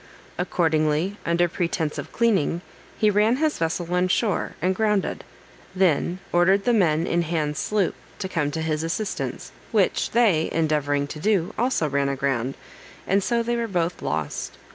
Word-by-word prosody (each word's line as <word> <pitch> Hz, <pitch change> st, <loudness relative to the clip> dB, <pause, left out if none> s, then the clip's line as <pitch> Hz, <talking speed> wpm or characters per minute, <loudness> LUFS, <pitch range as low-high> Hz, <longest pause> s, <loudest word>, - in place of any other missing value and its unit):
Accordingly, 160 Hz, +1 st, +1 dB
under 170 Hz, +1 st, +3 dB
pretence 165 Hz, -2 st, -2 dB
of -, -, -7 dB
cleaning, 195 Hz, -8 st, +1 dB, 0.4 s
he 215 Hz, -1 st, +3 dB
ran 210 Hz, +4 st, +3 dB
his 305 Hz, +2 st, 0 dB
vessel 170 Hz, +1 st, -1 dB
on 180 Hz, +1 st, +2 dB
shore, 200 Hz, +2 st, 0 dB
and 185 Hz, +2 st, +1 dB
grounded; 210 Hz, -1 st, 0 dB, 0.5 s
then 180 Hz, -1 st, +2 dB
ordered 190 Hz, +3 st, +3 dB
the 245 Hz, -, +3 dB
men 165 Hz, -6 st, +3 dB
in 170 Hz, 0 st, +1 dB
Hands' 155 Hz, -3 st, -1 dB
sloop 205 Hz, -4 st, 0 dB, 0.2 s
to 190 Hz, -, -3 dB
come 165 Hz, -6 st, -1 dB
to 160 Hz, +2 st, -3 dB
his 155 Hz, -1 st, -1 dB
assistance, 190 Hz, +5 st, -3 dB, 0.2 s
which -, -, +2 dB
they 205 Hz, -10 st, +3 dB
endeavoring 150 Hz, -3 st, +1 dB
to 150 Hz, +2 st, -8 dB
do, 190 Hz, -1 st, +1 dB
also 240 Hz, -10 st, +1 dB
ran 140 Hz, -1 st, 0 dB
aground, 135 Hz, -2 st, -1 dB, 0.5 s
and 195 Hz, +1 st, +2 dB
so 235 Hz, +2 st, +1 dB
they 240 Hz, +1 st, -1 dB
were 235 Hz, -1 st, -1 dB
both 175 Hz, -3 st, -1 dB
lost. 75 Hz, -1 st, -3 dB
175 Hz, 160 wpm, -24 LUFS, 155-205 Hz, 0.5 s, under